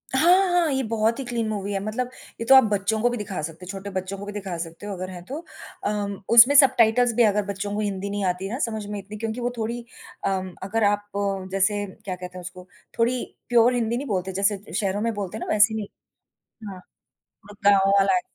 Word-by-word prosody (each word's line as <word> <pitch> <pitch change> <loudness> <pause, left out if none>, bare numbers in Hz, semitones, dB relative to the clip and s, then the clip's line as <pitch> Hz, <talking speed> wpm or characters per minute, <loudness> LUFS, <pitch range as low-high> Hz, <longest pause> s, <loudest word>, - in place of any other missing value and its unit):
हाँ, 360 +7 +5
हाँ, 345 -3 +2
ये 265 -1 0
बहुत 225 +1 0
ही - - -3
क्लीन 235 -2 -2
मूवी 205 -1 -3
है, 195 - 0
मतलब 235 +4 -2 0.3
ये 230 - -3
तो 270 - +7
आप 265 - +9
बच्चों 205 +2 0
को 245 - +3
भी 245 - -3
दिखा 200 -6 -4
सकते 165 +4 -7
हो, - - -12
छोटे 195 0 -7
बच्चों 190 +2 -6
को 200 - -7
भी 205 - -6
दिखा 195 -4 -5
सकते 165 +3 -7
हो 205 - -4
अगर 185 0 -5
है 180 -2 -8
तो। 275 +9 -5 0.4
अम, 205 -1 -2
उसमें 240 +4 +8
सबटाइटल्स 245 -3 +5
भी 240 - +5
अगर 210 -1 +2
बच्चों 200 0 -4
को - - -2
हिंदी 200 -2 -2
नहीं 205 0 -3
आती 185 +1 -1
ना 245 +5 -4
समझ 220 -5 -2
में 205 0 -5
इतनी 205 +2 -9
क्योंकि 225 +2 -4
वो 240 - 0
थोड़ी 235 +2 -3 0.4
अम, 190 -2 -2
अगर 220 +4 -1
आप 205 0 -2 0.4
जैसे 205 +2 +1 0.2
क्या 185 -2 -3
कहते 180 0 -9
हैं - - -7
उसको 180 +1 -10 0.3
थोड़ी 240 +2 +2 0.3
प्योर 240 0 +5
हिंदी 235 -1 0
नहीं 280 +3 -4
बोलते 190 -3 -2
जैसे 200 0 +2
शहरों 200 0 -1
में 230 +1 0
बोलते 205 0 -5
हैं - - -5
ना - - -3
वैसे 215 +1 +5
नहीं। 215 -2 -4 0.8
हाँ, 190 - -9 0.5
वो 205 +1 -17
गाँव 195 -1 +5
वाला 195 -1 +4
है। 180 - +3
205 Hz, 230 wpm, -24 LUFS, 195-230 Hz, 0.8 s, आप